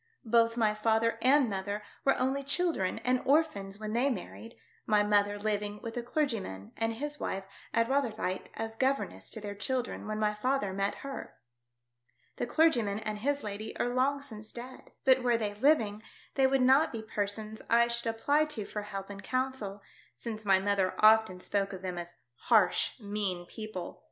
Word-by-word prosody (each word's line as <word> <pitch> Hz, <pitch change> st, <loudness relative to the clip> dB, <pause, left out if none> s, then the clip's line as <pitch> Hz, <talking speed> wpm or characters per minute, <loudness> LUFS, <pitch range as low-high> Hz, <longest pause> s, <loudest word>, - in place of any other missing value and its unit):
Both 230 Hz, 0 st, +3 dB
my 215 Hz, -2 st, +3 dB
father 225 Hz, +1 st, +1 dB
and 270 Hz, +1 st, +5 dB
mother 200 Hz, +1 st, -3 dB, 0.2 s
were 275 Hz, -, +3 dB
only 265 Hz, +2 st, 0 dB
children 285 Hz, -, 0 dB
and 255 Hz, 0 st, +2 dB
orphans 255 Hz, -10 st, +1 dB
when 215 Hz, 0 st, -4 dB
they 250 Hz, +4 st, +3 dB
married, 230 Hz, 0 st, -6 dB, 0.3 s
my 210 Hz, -1 st, +4 dB
mother 205 Hz, 0 st, +2 dB
living 210 Hz, 0 st, -2 dB
with 225 Hz, -1 st, -5 dB
a 240 Hz, -, -1 dB
clergyman 230 Hz, -, -2 dB
and 225 Hz, 0 st, 0 dB
his 295 Hz, +5 st, -4 dB
wife 190 Hz, 0 st, -2 dB, 0.3 s
at 230 Hz, 0 st, +2 dB
Rotherhithe 225 Hz, -8 st, -1 dB
as 225 Hz, 0 st, -4 dB
governess 260 Hz, -, -1 dB
to -, -, -6 dB
their 205 Hz, -1 st, -5 dB
children 245 Hz, +3 st, -2 dB
when 215 Hz, 0 st, -2 dB
my 210 Hz, -1 st, +1 dB
father 210 Hz, -2 st, 0 dB
met 195 Hz, +1 st, 0 dB
her. 275 Hz, -, -6 dB, 1.0 s
The -, -, -2 dB
clergyman 240 Hz, -9 st, +3 dB
and 215 Hz, -1 st, -4 dB
his 285 Hz, +5 st, 0 dB
lady 210 Hz, +1 st, -5 dB
are 245 Hz, -, 0 dB
long 275 Hz, +2 st, +1 dB
since 220 Hz, -5 st, -8 dB
dead. 250 Hz, +2 st, -10 dB
But 260 Hz, -1 st, +6 dB
were 240 Hz, -2 st, +3 dB
they 210 Hz, -2 st, -2 dB
living, 215 Hz, -3 st, +2 dB, 0.3 s
they 270 Hz, -1 st, +4 dB
would 265 Hz, -1 st, +2 dB
not 265 Hz, +5 st, +5 dB
be 225 Hz, -1 st, -5 dB
persons 215 Hz, 0 st, -3 dB
I 235 Hz, +1 st, +5 dB
should 235 Hz, 0 st, -2 dB
apply 285 Hz, +7 st, +2 dB
to 255 Hz, -9 st, -4 dB
for 210 Hz, -, -4 dB
help 195 Hz, -1 st, -6 dB
and 200 Hz, 0 st, -8 dB
counsel, 255 Hz, -6 st, -2 dB, 0.3 s
since 220 Hz, -2 st, -6 dB
my 195 Hz, -1 st, +6 dB
mother 195 Hz, -1 st, +1 dB
often 215 Hz, -3 st, +5 dB
spoke 200 Hz, +1 st, -1 dB
of 190 Hz, 0 st, -8 dB
them 180 Hz, -2 st, -3 dB
as 175 Hz, 0 st, -8 dB, 0.3 s
harsh, 215 Hz, +1 st, +3 dB
mean 200 Hz, -4 st, -3 dB
people. 215 Hz, -2 st, -7 dB
220 Hz, 175 wpm, -31 LUFS, 205-255 Hz, 1.0 s, But